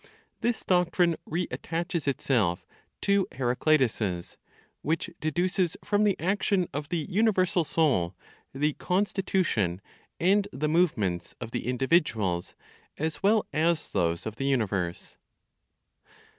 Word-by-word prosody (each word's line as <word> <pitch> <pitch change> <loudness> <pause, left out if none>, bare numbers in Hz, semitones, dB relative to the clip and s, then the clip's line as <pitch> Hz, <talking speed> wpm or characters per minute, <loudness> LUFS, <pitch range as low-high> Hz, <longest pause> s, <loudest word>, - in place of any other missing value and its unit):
This 240 -1 -1
doctrine 180 -1 +2
reattaches 170 -1 -2
itself 115 -10 +1 0.4
to 200 -1 +2
(Heraclitus's) 120 - 0 0.4
which 160 +3 -1
deduces 175 +3 0
from 205 0 +2
the 200 -3 +1
action 190 0 +1
of 145 +1 -4
the 165 -4 -1
universal 190 -3 +2
Soul 130 - +1 0.4
the 150 +2 0
constitution 180 - 0 0.4
and 195 +3 +3
the 145 +4 -2
movements 110 - +1
of 115 -2 -6
the - - -3
individuals 125 - +1 0.4
as 160 +1 -2
well 210 +2 +3
as 160 +1 +1
those 85 -3 0
of 110 0 -5
the 135 - -2
universe. 100 -10 -1
155 Hz, 110 wpm, -28 LUFS, 115-180 Hz, 0.4 s, and